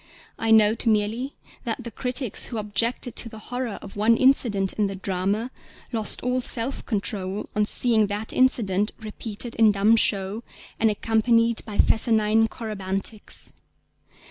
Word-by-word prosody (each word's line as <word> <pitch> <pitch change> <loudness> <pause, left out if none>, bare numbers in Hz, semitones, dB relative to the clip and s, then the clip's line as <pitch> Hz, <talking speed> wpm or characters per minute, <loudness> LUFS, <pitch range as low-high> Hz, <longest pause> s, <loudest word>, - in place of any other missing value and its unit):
I 225 - -1
note 220 +1 +4
merely 220 +5 0 0.3
that 235 +1 -3
the 235 - -7
critics 250 +1 -2
who 235 - -5
objected 215 +3 -1
to 230 - 0
the 220 - -11
horror 245 0 -5
of 195 - -10
one 220 +3 +3
incident 225 -8 +3
in 210 -1 0
the 195 - -5
drama 195 +5 -2 0.4
lost 220 -4 +1
all 250 +1 0
self 245 +2 -1
control 200 -3 -3
on 210 0 +2
seeing 220 -1 +3
that 205 +2 -4
incident 210 -6 +2
repeated 220 +1 -6
in 220 -1 +6
dumb 205 +3 +4
show 200 -1 +1 0.4
and 225 - +4
accompanied 230 +2 +1
by 210 -2 -6
fescennine 220 -1 +3
corybantics. 205 -2 -5
220 Hz, 145 wpm, -24 LUFS, 205-235 Hz, 0.4 s, in